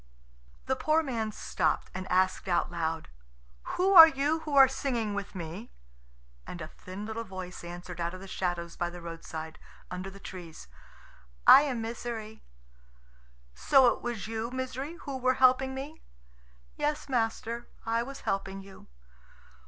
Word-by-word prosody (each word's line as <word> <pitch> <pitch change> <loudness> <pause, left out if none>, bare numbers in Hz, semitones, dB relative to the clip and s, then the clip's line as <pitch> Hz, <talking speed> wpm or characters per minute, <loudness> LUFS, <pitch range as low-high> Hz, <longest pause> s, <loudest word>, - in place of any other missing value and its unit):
The - - +1
poor 315 +1 +2
man 230 -6 -2
stopped, - - -1
and 185 0 -6
asked 185 +1 +2
out 175 -1 +1
loud, 165 -2 -2 0.7
"Who 380 +2 +3
are 330 -3 +13
you 295 +2 0
who 305 -3 -4
are 270 -1 +9
singing 250 -5 -2
with 200 0 -5
me?" 180 +6 -6 0.8
And 180 - -7
a 155 -1 -7 0.2
little 210 +3 -5
thin - - -5
voice 185 -2 -7
answered 175 0 -7
out 170 +2 -2
of - - -9
the 195 - -10
shadows 175 -2 -3
by 175 - -1
the 175 +1 -9
roadside, 165 -1 -7 0.3
under 185 +1 -5
the 195 +1 -12
trees, 175 - -9 0.8
"I - - +10
am 240 -4 -2
Misery." 225 -1 -6 1.1
"So 250 - +5
it - - -11
was 240 -3 -4
you, 225 +1 -3
Misery, 260 +4 -4
who 275 -2 -5
were 255 0 +2
helping 265 +1 +4
me?" 290 +4 -7 0.8
"Yes, 300 +1 -1
master, 235 -1 -1 0.2
I 230 +1 +1
was 275 +3 -7
helping 195 0 -3
you." 195 0 -14
220 Hz, 155 wpm, -29 LUFS, 180-265 Hz, 1.1 s, are